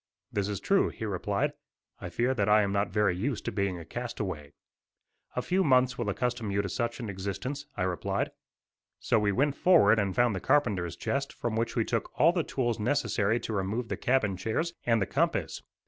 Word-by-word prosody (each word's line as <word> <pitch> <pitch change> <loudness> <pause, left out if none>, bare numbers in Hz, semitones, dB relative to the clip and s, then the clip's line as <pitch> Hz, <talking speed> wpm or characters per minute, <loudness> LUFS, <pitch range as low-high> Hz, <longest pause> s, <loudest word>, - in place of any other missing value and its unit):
"That 100 -1 0
is 100 -2 -3
true," 195 - +2
he 110 - -6
replied; 100 -4 -1 0.5
"I 90 - -6
fear 120 +9 +1
that 105 -5 0
I 105 0 +6
am 100 - -1
not 100 +1 +1
very 105 -4 +2
used 115 +6 -2
to - - -1
being 100 -3 -1
a 85 - -9
castaway." 95 -9 -5 0.8
"A - - -1
few 190 +1 +2
months 130 -4 +4
will 120 -4 -2
accustom 120 +1 -1
you 100 0 0
to 100 - -3
such 120 +5 -2
an 120 - -4
existence," 100 +9 -4
I 90 - 0
replied. 90 -1 -1 0.7
So 115 - +2
we 105 -1 +2
went 140 +7 +1
forward 125 - +5
and 100 -3 -1
found 120 -4 +3
the - - -2
carpenter's 95 - +1
chest, 140 0 -2
from 115 -2 -3
which 115 +1 -1
we 115 -3 +1
took 115 -2 -1
all 165 - +6
the 175 -1 0
tools 120 -7 -1
necessary 115 -3 +1
to 110 - -4
remove 105 +5 -2
the - - -1
cabin 110 -7 +1
chairs, 115 - -1
and 115 -1 +4
the 100 - +1
compass. - - -1
110 Hz, 205 wpm, -29 LUFS, 100-125 Hz, 0.8 s, I